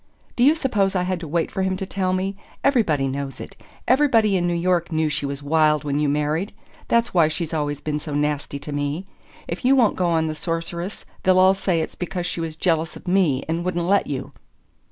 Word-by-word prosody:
"Do 240 Hz, -, +2 dB
you 295 Hz, +4 st, +6 dB
suppose 205 Hz, -10 st, 0 dB
I 180 Hz, -, +2 dB
had 185 Hz, -1 st, -1 dB
to 165 Hz, -, -7 dB
wait 165 Hz, +2 st, -1 dB
for 190 Hz, -, -2 dB
him 190 Hz, 0 st, 0 dB
to 195 Hz, -, -4 dB
tell 185 Hz, -1 st, -1 dB
me? 190 Hz, +1 st, -1 dB, 0.3 s
Everybody 185 Hz, -, +2 dB
knows 135 Hz, 0 st, -4 dB
it -, -, -9 dB, 0.3 s
everybody 230 Hz, -8 st, +4 dB
in 175 Hz, -1 st, +1 dB
New 175 Hz, -, 0 dB
York 175 Hz, 0 st, +1 dB
knew 160 Hz, -1 st, +1 dB
she 145 Hz, -1 st, -2 dB
was 140 Hz, 0 st, -5 dB
wild 155 Hz, 0 st, +3 dB
when 145 Hz, 0 st, -1 dB
you 150 Hz, -1 st, +2 dB
married. 150 Hz, +7 st, -1 dB, 0.3 s
That's 235 Hz, 0 st, +2 dB
why 170 Hz, -4 st, +5 dB
she's 160 Hz, +1 st, -3 dB
always 145 Hz, -2 st, -2 dB
been 150 Hz, -1 st, -2 dB
so 150 Hz, -1 st, -5 dB
nasty 145 Hz, -1 st, -1 dB
to 145 Hz, +1 st, -8 dB
me. 145 Hz, +5 st, -2 dB, 0.4 s
If -, -, -5 dB
you 260 Hz, +2 st, +5 dB
won't 240 Hz, -5 st, +3 dB
go 180 Hz, -, +1 dB
on 165 Hz, -1 st, +2 dB
the 155 Hz, -, -2 dB
Sorceress 170 Hz, +3 st, -4 dB, 0.2 s
they'll 185 Hz, 0 st, +4 dB
all 185 Hz, +1 st, +6 dB
say 185 Hz, -4 st, 0 dB
it's 160 Hz, -, -4 dB
because 180 Hz, 0 st, -4 dB
she 170 Hz, -, -3 dB
was 160 Hz, -1 st, -4 dB
jealous 165 Hz, -1 st, 0 dB
of -, -, -13 dB
me 180 Hz, -8 st, +2 dB
and 165 Hz, +2 st, -1 dB
wouldn't 175 Hz, -1 st, -1 dB
let 200 Hz, +3 st, +2 dB
you." 135 Hz, -3 st, -4 dB
170 Hz, 225 wpm, -22 LUFS, 150-190 Hz, 0.4 s, you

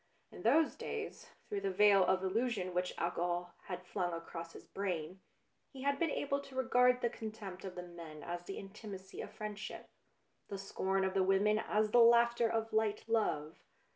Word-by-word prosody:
In -, -, -10 dB
those 300 Hz, +7 st, +4 dB
days, 440 Hz, -1 st, -5 dB, 0.2 s
through 410 Hz, -1 st, -2 dB
the 395 Hz, -, 0 dB
veil 205 Hz, -, +6 dB
of 185 Hz, +1 st, +2 dB
illusion 195 Hz, -2 st, 0 dB
which 180 Hz, +1 st, 0 dB
alcohol 175 Hz, +1 st, -1 dB
had 180 Hz, -1 st, -6 dB
flung 175 Hz, -1 st, -2 dB
across 165 Hz, 0 st, -6 dB
his -, -, -11 dB
brain, 185 Hz, -2 st, -3 dB, 0.5 s
he 265 Hz, -2 st, -8 dB
had 280 Hz, 0 st, +1 dB
been 335 Hz, -, +2 dB
able 280 Hz, -1 st, 0 dB
to 275 Hz, -1 st, -11 dB
regard 250 Hz, -1 st, +4 dB
the 235 Hz, -, +2 dB
con 220 Hz, -2 st, -5 dB
tempt 195 Hz, -4 st, -8 dB
of 185 Hz, -, -6 dB
the 180 Hz, -, -5 dB
men 170 Hz, -3 st, -9 dB
as 175 Hz, 0 st, -4 dB
the 195 Hz, +3 st, -7 dB
intimacy 195 Hz, -1 st, -8 dB
of -, -, -6 dB
friend 210 Hz, -1 st, -6 dB
ship, 215 Hz, -, -7 dB, 0.6 s
the 200 Hz, -, -5 dB
scorn 195 Hz, 0 st, -1 dB
of 190 Hz, -, -1 dB
the 195 Hz, -, +3 dB
women 195 Hz, +3 st, +3 dB
as 215 Hz, 0 st, +1 dB
the 245 Hz, -, +6 dB
laughter 235 Hz, 0 st, +6 dB
BLUE -, -, -2 dB
BLOOD 225 Hz, -, -12 dB
239 220 Hz, 0 st, +3 dB
of 205 Hz, -, -6 dB
light -, -, -16 dB, 0.3 s
love. 150 Hz, +2 st, -7 dB
200 Hz, 200 wpm, -35 LUFS, 180-235 Hz, 0.6 s, veil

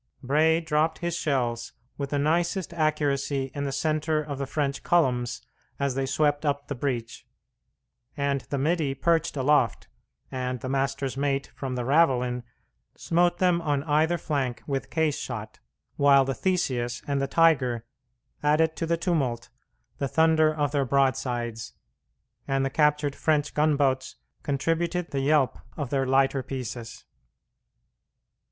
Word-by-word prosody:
Bray 155 Hz, +5 st, +3 dB
dropped 160 Hz, 0 st, +1 dB
his 170 Hz, -1 st, -2 dB
shells 120 Hz, -7 st, -1 dB, 0.2 s
with 140 Hz, -1 st, -4 dB
the 145 Hz, -, -1 dB
nicest 170 Hz, +5 st, 0 dB
accuracy 145 Hz, -4 st, 0 dB
in 140 Hz, 0 st, -3 dB
the 140 Hz, -, -2 dB
centre 155 Hz, +2 st, 0 dB
of 145 Hz, -2 st, -5 dB
the 140 Hz, -, -3 dB
French 140 Hz, -2 st, -2 dB
columns 125 Hz, -7 st, +1 dB, 0.4 s
as 140 Hz, -2 st, 0 dB
they 135 Hz, +1 st, -1 dB
swept 145 Hz, +2 st, +1 dB
up 145 Hz, -1 st, -1 dB
the -, -, -3 dB
breach, 120 Hz, -3 st, -4 dB, 0.9 s
and 140 Hz, -1 st, 0 dB
the 140 Hz, -, -1 dB
middy 150 Hz, -1 st, 0 dB
perched 165 Hz, +2 st, +1 dB
aloft, 145 Hz, +3 st, +2 dB, 0.4 s
and 125 Hz, -1 st, -3 dB
the 130 Hz, -, -4 dB
master's 135 Hz, 0 st, -1 dB
mate 140 Hz, 0 st, -1 dB
from 130 Hz, -2 st, -4 dB
the 125 Hz, -1 st, -3 dB
ravelin, 125 Hz, -4 st, +2 dB, 0.6 s
smote 175 Hz, +1 st, +2 dB
them 180 Hz, -2 st, +2 dB
on 145 Hz, -3 st, 0 dB
either 160 Hz, +3 st, +2 dB
flank 135 Hz, -6 st, -2 dB
with 135 Hz, -2 st, -3 dB
case 160 Hz, -3 st, 0 dB
shot, -, -, -6 dB, 0.4 s
while 140 Hz, -1 st, +5 dB
the 135 Hz, -, -1 dB
Theseus 130 Hz, -10 st, -1 dB
and 140 Hz, -1 st, -1 dB
the 140 Hz, -, 0 dB
Tigre 135 Hz, -8 st, +3 dB, 0.6 s
added 160 Hz, +2 st, +2 dB
to 165 Hz, -, -2 dB
the 170 Hz, 0 st, +1 dB
tumult 135 Hz, -10 st, -1 dB, 0.5 s
the 140 Hz, -, 0 dB
thunder 160 Hz, +1 st, +4 dB
of 145 Hz, -2 st, -1 dB
their 145 Hz, -2 st, +1 dB
broadsides, 125 Hz, -4 st, -1 dB, 0.7 s
and 135 Hz, 0 st, +1 dB
the 135 Hz, -, -2 dB
captured 150 Hz, -1 st, +2 dB
French 150 Hz, -2 st, +1 dB
gunboats 140 Hz, -4 st, +1 dB, 0.3 s
contributed 165 Hz, +5 st, -1 dB
the 140 Hz, -, -1 dB
yelp 140 Hz, -1 st, +2 dB, 0.2 s
of 145 Hz, -5 st, -4 dB
their 135 Hz, -2 st, +1 dB
lighter 135 Hz, +1 st, +3 dB
pieces. 120 Hz, -3 st, -6 dB
140 Hz, 145 wpm, -26 LUFS, 135-155 Hz, 0.9 s, while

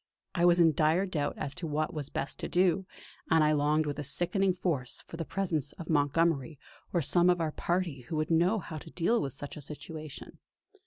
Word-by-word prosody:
I 175 Hz, -1 st, +2 dB
was 175 Hz, 0 st, +5 dB
in 165 Hz, -2 st, +6 dB
dire 160 Hz, +6 st, +3 dB
doubt 160 Hz, -6 st, -2 dB
as 140 Hz, -, -3 dB
to 180 Hz, -2 st, -5 dB
what 155 Hz, +4 st, -1 dB
was 150 Hz, -3 st, -4 dB
best 140 Hz, -, -4 dB
to -, -, -3 dB
do; 185 Hz, +1 st, +2 dB, 0.4 s
and 160 Hz, -1 st, +5 dB
I 150 Hz, -, +4 dB
longed 150 Hz, +1 st, +2 dB
with 145 Hz, 0 st, -3 dB
a -, -, -2 dB
sickening 180 Hz, +7 st, +1 dB
force 150 Hz, -9 st, -2 dB
for -, -, -9 dB
the 165 Hz, -, -3 dB
presence 160 Hz, -6 st, -2 dB
of 170 Hz, -1 st, -6 dB
Montgomery 150 Hz, 0 st, +1 dB, 0.3 s
or 170 Hz, -3 st, +1 dB
some 175 Hz, +5 st, +4 dB
of 180 Hz, -1 st, +3 dB
our 160 Hz, -2 st, 0 dB
party 175 Hz, -4 st, -1 dB
who 125 Hz, +7 st, -6 dB
would 155 Hz, +1 st, -1 dB
know 175 Hz, +6 st, +3 dB
how 160 Hz, -5 st, -6 dB
to 160 Hz, -, -12 dB
deal 205 Hz, +9 st, +1 dB
with 135 Hz, -, -3 dB
such 145 Hz, 0 st, -8 dB
a 150 Hz, -, -8 dB
situation. 155 Hz, +1 st, -8 dB
160 Hz, 215 wpm, -30 LUFS, 150-175 Hz, 0.4 s, in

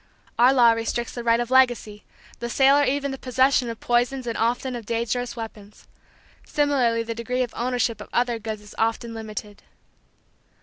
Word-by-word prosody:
Our 245 Hz, +2 st, +7 dB
law 245 Hz, -3 st, +6 dB
restricts 230 Hz, +1 st, -2 dB
the 240 Hz, -, -6 dB
right 230 Hz, 0 st, +3 dB
of 240 Hz, +1 st, -3 dB
legacy, 245 Hz, -5 st, +2 dB, 0.3 s
the 235 Hz, -, -4 dB
sale 270 Hz, +3 st, +5 dB
or 290 Hz, -, +4 dB
even 280 Hz, +1 st, -1 dB
the 270 Hz, -, -6 dB
possession 260 Hz, -1 st, +2 dB
of 230 Hz, -1 st, -6 dB
poisons 245 Hz, +2 st, 0 dB
and 230 Hz, -1 st, -3 dB
often 245 Hz, +3 st, -1 dB
of 230 Hz, -3 st, -8 dB
dangerous 235 Hz, +1 st, -2 dB
weapons. 215 Hz, -3 st, -10 dB, 0.6 s
Similarly 260 Hz, -6 st, +1 dB
the 230 Hz, 0 st, -4 dB
degree 250 Hz, +2 st, -2 dB
of 240 Hz, -, -6 dB
ownership 240 Hz, -3 st, -1 dB
of -, -, -10 dB
other 240 Hz, -1 st, 0 dB
goods 215 Hz, -1 st, -6 dB
is 210 Hz, -, -13 dB
often 230 Hz, +1 st, -1 dB
limited. 215 Hz, -2 st, -7 dB
235 Hz, 175 wpm, -24 LUFS, 225-255 Hz, 0.6 s, Our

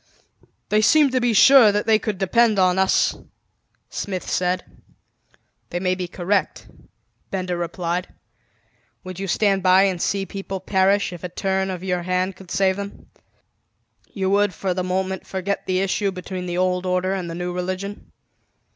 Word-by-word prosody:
"They 215 Hz, 0 st, +3 dB
seem 290 Hz, +5 st, +5 dB
to 255 Hz, 0 st, +1 dB
be 240 Hz, -1 st, +2 dB
sure 235 Hz, +1 st, +7 dB
that 205 Hz, +1 st, -1 dB
they 220 Hz, -1 st, +4 dB
could 210 Hz, -3 st, -3 dB
depend 215 Hz, +3 st, +2 dB
on 185 Hz, 0 st, +3 dB
us," 190 Hz, 0 st, +2 dB, 0.8 s
Smith 185 Hz, -3 st, -4 dB
said. 180 Hz, 0 st, 0 dB, 1.1 s
"They 175 Hz, -, -3 dB
may 185 Hz, 0 st, +1 dB
be 180 Hz, -1 st, -4 dB
correct," 185 Hz, +3 st, -1 dB, 0.6 s
Benda 185 Hz, -2 st, -2 dB
replied. 175 Hz, +1 st, -3 dB, 1.0 s
"Would 185 Hz, -1 st, -8 dB
you 195 Hz, -, -4 dB
stand 195 Hz, 0 st, +2 dB
by 185 Hz, +1 st, +5 dB
and 185 Hz, -3 st, 0 dB
see 195 Hz, -1 st, 0 dB
people 195 Hz, -1 st, -6 dB
perish 190 Hz, 0 st, +1 dB
if 175 Hz, -, -10 dB
a 180 Hz, -, -4 dB
turn 190 Hz, +2 st, -1 dB
of 185 Hz, -1 st, -5 dB
your 180 Hz, -2 st, -1 dB
hand 185 Hz, +1 st, -1 dB
could 185 Hz, -1 st, -14 dB
save 190 Hz, 0 st, +1 dB
them? 200 Hz, 0 st, -8 dB, 1.0 s
You 190 Hz, -2 st, -1 dB
would 205 Hz, -1 st, +2 dB
for 190 Hz, -2 st, -2 dB
the 185 Hz, 0 st, -2 dB
moment, 190 Hz, +1 st, -2 dB
forget 190 Hz, +1 st, -3 dB
the 185 Hz, 0 st, +1 dB
issue 195 Hz, +1 st, 0 dB
between 185 Hz, 0 st, -6 dB
the 175 Hz, 0 st, -3 dB
old 185 Hz, 0 st, 0 dB
order 185 Hz, +1 st, 0 dB
and 185 Hz, -3 st, -4 dB
the 165 Hz, -, -5 dB
new 175 Hz, +1 st, -4 dB
religion." 185 Hz, +3 st, -5 dB
190 Hz, 165 wpm, -22 LUFS, 180-200 Hz, 1.1 s, sure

